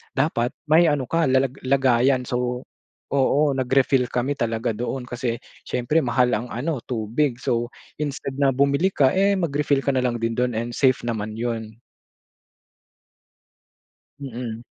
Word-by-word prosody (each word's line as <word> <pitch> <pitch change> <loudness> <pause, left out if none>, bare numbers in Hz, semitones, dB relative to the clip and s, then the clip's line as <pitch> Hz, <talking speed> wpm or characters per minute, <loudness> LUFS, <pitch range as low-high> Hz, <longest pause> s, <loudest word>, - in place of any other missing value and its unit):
dapat 135 -3 0
may 165 +2 +6
ano 145 -3 +1
ka, 165 -2 +2
lalag 130 0 +1
lagayan. 130 -1 +3
So, 125 0 -2 0.5
oo, 140 +1 +3
nag-refill 130 -1 +2
kami 130 +4 -1
talaga 115 -1 -1
doon. 125 +4 -4
Kasi 125 -1 -3 0.3
syempre 125 +6 +1
mahal 125 -3 +2
ang 115 +3 -1
ano 135 +5 -3
tubig. 120 +3 -1
So, 120 -1 0 0.3
instead 140 -2 -4
na 135 -1 +3
bumili 140 +7 +2
ka, 135 -2 +4
eh, 200 +1 +3
mag-refill 145 -5 0
ka 140 - +1
nalang 125 -3 0
din 115 0 0
do'n 125 0 +1
and 115 +2 -2
safe 130 +1 +2
naman 110 -2 -3
'yon. 115 -1 -4 2.4
Mm. 120 -3 -6
130 Hz, 140 wpm, -23 LUFS, 120-140 Hz, 2.4 s, may